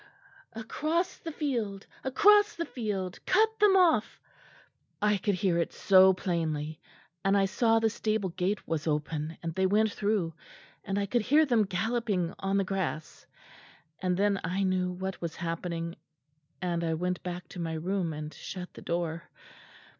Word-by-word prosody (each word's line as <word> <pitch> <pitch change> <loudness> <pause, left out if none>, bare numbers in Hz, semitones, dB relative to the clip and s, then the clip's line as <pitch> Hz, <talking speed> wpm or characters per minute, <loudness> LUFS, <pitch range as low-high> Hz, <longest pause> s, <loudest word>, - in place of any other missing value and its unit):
'Across 310 +11 -2
the 330 - -6
field 230 -10 -2 0.2
across 415 +10 +5
the 335 - -2
field 200 - -4
cut 440 +3 +3
them 410 -2 +6
off!' 330 - +3 0.8
I 210 0 +3
could 200 +1 0
hear 185 -3 +1
it 170 - -1
so 190 -1 +6
plainly; 160 -4 -2 0.4
and 195 +1 +3
I 195 - +4
saw 225 +4 +2
the 225 0 +3
stable 215 -3 -1
gate 185 +4 -2
was 165 -1 -2
open, 150 +1 -2
and 165 -1 -3
they 190 +2 +2
went 215 +2 +3
through, 200 -6 0 0.5
and 195 - -2
I 200 - +1
could 240 +4 +1
hear 295 +8 +4
them 235 -6 +3
galloping 200 -2 -1
on 195 +1 0
the 195 - +2
grass. 185 -6 -4 0.7
And 180 -1 0
then 200 0 +2
I 185 +4 -1
knew 185 -1 +1
what 190 +1 -5
was 170 -2 -4
happening; 170 0 -4 0.7
and 170 -1 -1
I 165 -1 0
went 180 +2 -2
back 180 0 -6
to - - -9
my 165 -1 -2
room 175 +1 -1
and 150 0 -6
shut 180 +4 -7
the - - -11
door." 170 0 -3
190 Hz, 160 wpm, -29 LUFS, 170-220 Hz, 0.8 s, them